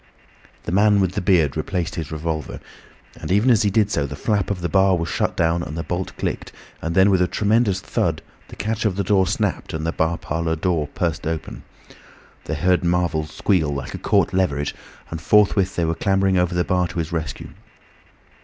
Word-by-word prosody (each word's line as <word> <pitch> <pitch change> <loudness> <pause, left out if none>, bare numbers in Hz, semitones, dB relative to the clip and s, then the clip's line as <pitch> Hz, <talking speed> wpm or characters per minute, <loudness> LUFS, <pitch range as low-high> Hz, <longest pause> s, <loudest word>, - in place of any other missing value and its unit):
The - - -4
man 105 +2 +4
with 95 -2 +1
the - - -3
beard 85 -7 +3
replaced 90 -3 -2
his 80 -2 -5
revolver. 80 -1 -4 0.6
And - - -5
even 105 +7 +4
as 115 - +4
he 105 - +2
did 105 0 +2
so 70 - 0
the 70 - -7
flap 100 +4 0
of 100 -3 -2
the 85 - 0
bar 95 +1 +3
was 85 0 -2
shut - - -1
down 85 0 +2
and 75 -1 -6
the 80 - -2
bolt 90 +1 -3
clicked, - - -3 0.3
and 85 +1 -3
then 95 +1 +5
with 95 -2 +3
a 90 - +3
tremendous 105 -2 +1
thud - - -1 0.2
the - - -11
catch 110 +1 -2
of 105 -5 +1
the 100 - -1
door 95 -1 +3
snapped 100 -3 -2
and 80 0 -3
the 80 - 0
bar 80 0 0
parlour 80 +1 -2
door 80 -3 -1
burst 85 -2 -1
open. 80 -1 -4 0.8
They 80 - -2
heard 90 +5 +2
Marvel 85 -3 0
squeal 80 0 0
like 70 -1 -5
a - - -5
caught - - +2
leveret, 75 -7 0 0.4
and 80 -1 -5
forthwith 100 +2 +3
they 85 - +1
were 80 - 0
clambering 95 +2 +1
over 90 -1 +1
the 90 - +2
bar 90 0 +1
to - - -9
his 80 -1 -2
rescue. 80 -3 -4
90 Hz, 210 wpm, -22 LUFS, 80-95 Hz, 0.8 s, then